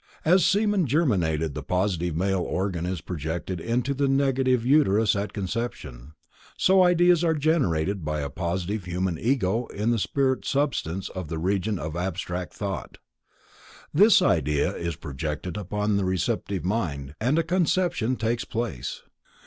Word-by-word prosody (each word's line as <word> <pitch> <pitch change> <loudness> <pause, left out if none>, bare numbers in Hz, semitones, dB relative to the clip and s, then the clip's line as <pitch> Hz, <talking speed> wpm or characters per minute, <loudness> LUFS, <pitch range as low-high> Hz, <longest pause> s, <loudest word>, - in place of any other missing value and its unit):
As 180 +3 +5
semen 200 -2 +2
germinated 90 - +1
in - - -10
the - - -5
positive 90 -3 -1
male 95 +2 +1
organ 90 -2 -2
is 90 -3 -3
projected 85 +2 -4
into 120 +6 0
the 140 +1 0
negative 135 -3 +2
uterus 115 -8 +4
at 100 0 -2
conception, 90 - -5 0.4
so 190 0 +5
ideas 175 -1 +4
are 165 -1 +2
generated 100 - +1
by 75 0 -2
a 70 - -3
positive 90 +5 -3
Human 90 -1 -2
Ego 115 -2 0
in 105 +3 -1
the 115 - +1
spirit 130 +4 0
substance 115 - -1
of 95 -3 -6
the 80 +1 -4
Region 95 +4 0
of 80 -1 -5
abstract 90 0 -4
Thought. 100 -4 -5 1.0
This 200 +3 +6
idea 75 - +1
is 85 -2 -3
projected 75 +4 -5
upon 105 +1 -1
the 100 - 0
receptive 95 +1 -1
mind, 75 -10 -2
and 130 +7 +2
a 165 - +3
conception 175 -7 +1
takes 115 +1 -1
place. 110 - -4
100 Hz, 150 wpm, -25 LUFS, 85-135 Hz, 1.0 s, This